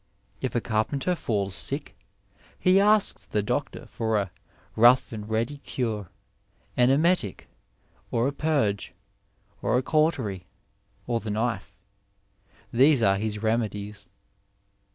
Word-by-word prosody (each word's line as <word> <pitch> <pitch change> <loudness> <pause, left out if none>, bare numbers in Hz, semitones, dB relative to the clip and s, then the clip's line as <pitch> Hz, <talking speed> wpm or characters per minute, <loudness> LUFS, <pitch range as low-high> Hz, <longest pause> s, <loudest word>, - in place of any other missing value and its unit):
If 130 - -3
a 120 - +2
carpenter 115 +11 0
falls 100 - -1
sick, - - 0 0.6
he 185 +1 +4
asks 210 0 +2
the 105 - -1
doctor - - -3
for 110 -1 -1
a 100 -3 -2 0.4
''rough 120 +3 +5
and 105 -1 -7
ready 115 +6 -1
cure 110 -9 -3 0.3
— 100 0 -38
an 125 0 +4
emetic, 150 - +1 0.6
or 115 +2 +1
a - - 0
purge, 140 -11 0 0.7
or - - +2
a 130 - 0
cautery, 130 - 0 0.6
or 120 -1 0
the 110 - -6
knife 105 -2 -3 0.4
— 100 0 -33
^these 130 -2 +5
are 95 0 +2
his 105 0 -3
remedies." 105 -3 -2
110 Hz, 130 wpm, -26 LUFS, 105-135 Hz, 0.7 s, rough